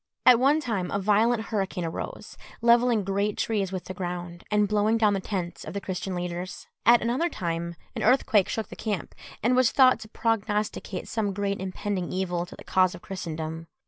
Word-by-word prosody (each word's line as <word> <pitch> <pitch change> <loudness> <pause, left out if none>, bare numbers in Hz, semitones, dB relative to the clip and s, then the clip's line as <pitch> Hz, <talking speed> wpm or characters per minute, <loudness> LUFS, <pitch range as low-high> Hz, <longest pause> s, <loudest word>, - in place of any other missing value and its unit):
At 245 -2 +8
one 280 +4 +4
time 215 - -2
a - - -1
violent 215 +3 +3
hurricane 195 -5 -2
arose, 165 - -6 0.3
levelling 235 -2 +4
great 200 +2 -1
trees 200 -4 0
with 185 -2 -4
the 185 - -6
ground, 175 -1 -5
and 210 -1 +3
blowing 210 +2 +2
down 215 -2 +3
the 195 - 0
tents 185 -3 -4
of - - -8
the - - 0
Christian 190 -1 -4
leaders. 175 +1 -5 0.2
At 235 -1 +7
another 255 +9 +1
time 170 - -3 0.2
an - - -3
earthquake 220 -5 +3
shook 220 - -3
the - - -8
camp, 210 -4 -3 0.3
and 245 +3 +3
was 255 -1 +5
thought 255 -3 +5
to 220 - -9
prognosticate 210 -4 -1
some 210 -3 -1
great 200 0 -2
impending 190 -1 -3
evil 180 -2 -1
to - - -11
the - - -12
cause 185 -1 +2
of 175 - -13
Christendom. 165 -3 -5
200 Hz, 190 wpm, -26 LUFS, 180-225 Hz, 0.3 s, At